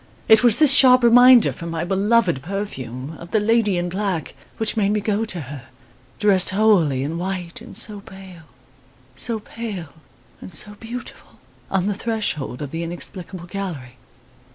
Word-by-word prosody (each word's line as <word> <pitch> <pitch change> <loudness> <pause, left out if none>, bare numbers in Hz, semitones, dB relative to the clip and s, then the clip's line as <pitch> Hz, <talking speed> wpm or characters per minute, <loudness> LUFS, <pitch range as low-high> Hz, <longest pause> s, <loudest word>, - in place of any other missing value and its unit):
* - - -31
It 220 +2 +6
was 235 -3 +5
this 300 -3 +7
sharp 255 -2 +6
reminder 245 0 +7
from 170 -1 -8
my 165 0 -3
beloved 195 - +1
perfume, 140 - -6
of 170 - -11
the 215 - +1
lady 210 -2 +1
in 175 0 -2
black, 185 -2 -3 0.2
which 220 0 -1
made 205 -3 +1
me 210 - +1
go 210 +1 -1
to 185 -6 -6
her 135 -2 -9 0.5
dressed 195 -3 +3
wholly 185 -10 +2
in 160 +4 -4
white 180 -2 -5
and - - -5
so 210 -2 +1
pale 190 -4 -13 0.7
so 225 - -3
pale 205 -8 -8 0.5
and - - -10
so 205 +6 -4
beautiful! 235 +2 -9 0.4
on 190 -1 0
the 205 - 0
threshold 200 - -3
of 140 - -7
the 165 - -4
inexplicable 175 +1 -6
gallery. 170 -10 -7
195 Hz, 165 wpm, -21 LUFS, 170-220 Hz, 0.7 s, this